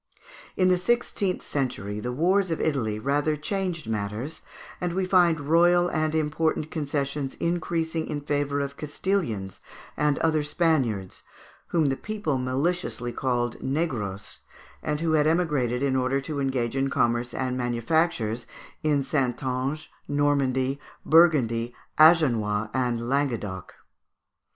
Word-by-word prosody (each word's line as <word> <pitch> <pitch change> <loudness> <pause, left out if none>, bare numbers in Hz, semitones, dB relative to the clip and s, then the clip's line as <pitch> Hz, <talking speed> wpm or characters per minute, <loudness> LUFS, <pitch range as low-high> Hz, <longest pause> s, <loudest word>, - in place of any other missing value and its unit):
In 185 -1 +4
the 180 -1 +3
sixteenth 200 -2 0
century 105 -7 -3
the 125 +3 -3
wars 185 +8 +2
of 165 - -1
Italy 120 -9 0
rather 145 +6 +1
changed 180 0 -3
matters, 110 +7 -3 0.4
and 175 -1 -1
we 190 +1 0
find 175 -3 +4
royal 175 +4 +4
and 155 -1 0
important 155 0 0
concessions 140 -2 -2
increasing 165 -1 -1
in 150 -1 -3
favour 145 -1 -1
of 140 0 -4
Castilians 145 - -2 0.4
and 150 -1 +1
other 160 -1 +2
Spaniards, 140 - 0 0.5
whom 160 -4 +2
the 135 - 0
people 205 -8 -2
maliciously 130 -1 -1
called 120 -2 -1
negroes, 125 - -2 0.4
and 150 0 -2
who 165 -1 +1
had 155 -1 +3
emigrated 145 -7 +1
in 135 -1 +1
order 130 +1 +1
to 140 +1 -4
engage 130 -3 -1
in 135 0 +1
commerce 120 -1 +1
and 130 -1 -2
manufactures 120 -1 0 0.3
in 145 -2 +2
Saintonge, 130 +2 -1 0.2
Normandy, 140 -2 +1 0.3
Burgundy, 125 -8 +4 0.2
Agenois, 115 -10 +4
and 120 -3 -1
Languedoc. 120 - -2
145 Hz, 125 wpm, -26 LUFS, 125-160 Hz, 0.5 s, In